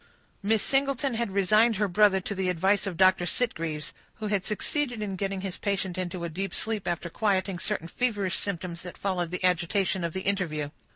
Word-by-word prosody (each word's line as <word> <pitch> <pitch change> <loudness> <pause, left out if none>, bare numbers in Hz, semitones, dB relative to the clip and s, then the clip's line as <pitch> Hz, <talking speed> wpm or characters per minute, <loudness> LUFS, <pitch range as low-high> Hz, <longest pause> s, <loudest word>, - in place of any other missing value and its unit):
Miss 215 +1 +2
Singleton 275 -1 +1
had 235 -1 -1
resigned 215 +4 +4
her 205 +1 +1
brother 200 +1 +4
to 200 - -3
the 190 -1 -1
advice 190 +4 +2
of 180 -4 -4
Dr. 185 -1 +5
Sitgreaves, 165 -11 -1 0.2
who 215 -1 -4
had 200 -3 +1
succeeded 245 +4 -1
in 205 -2 -3
getting 195 0 -2
his 190 -2 -5
patient 195 -3 -1
into 180 -1 -3
a - - -1
deep 185 +3 -4
sleep 220 -4 -1
after 170 0 -1
quieting 190 0 0
certain 165 0 -2
feverish 205 -3 0
symptoms 175 -3 -4
that 180 - -9
followed 180 -4 -1
the 180 +2 -4
agitation 185 +1 +2
of 170 -1 -2
the 190 - -2
interview. 165 -7 -1
190 Hz, 190 wpm, -28 LUFS, 180-210 Hz, 0.2 s, Dr